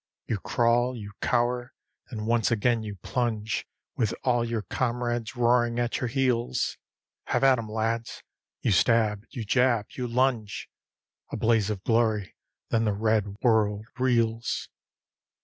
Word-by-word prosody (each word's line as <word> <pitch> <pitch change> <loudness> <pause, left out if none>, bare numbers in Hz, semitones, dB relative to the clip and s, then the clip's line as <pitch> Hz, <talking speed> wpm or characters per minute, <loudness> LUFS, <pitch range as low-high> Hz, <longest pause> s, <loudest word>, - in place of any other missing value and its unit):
You 110 - -2
crawl, 120 +3 +2
you 105 -2 -8
cower; 120 +1 0 0.4
then 110 -4 -5
once 115 -1 +2
again 120 0 +2
you 105 -2 -6
plunge 110 -4 -1 0.3
With 110 -4 0
all 120 -2 +2
your 115 -2 -2
comrades 120 +3 -2
roaring 120 -1 +2
at 120 0 0
your 125 - 0
heels. 120 - 0 0.5
HAVE - - 0
AT 135 -2 +5
'EM, 110 -2 -6
LADS! 115 +1 -2 0.4
You 115 - +1
stab, 105 +1 +3
you 120 -6 -6
jab, 120 -1 +2
you 125 -1 -4
lunge; 120 -3 0 0.6
A - - -3
blaze 110 -3 +2
of 100 -3 -4
glory, 110 -4 +1 0.3
then 115 0 +2
the 105 - +1
red 105 -1 0
world 105 -3 +2
reels. 115 -2 0
115 Hz, 140 wpm, -27 LUFS, 110-120 Hz, 0.6 s, AT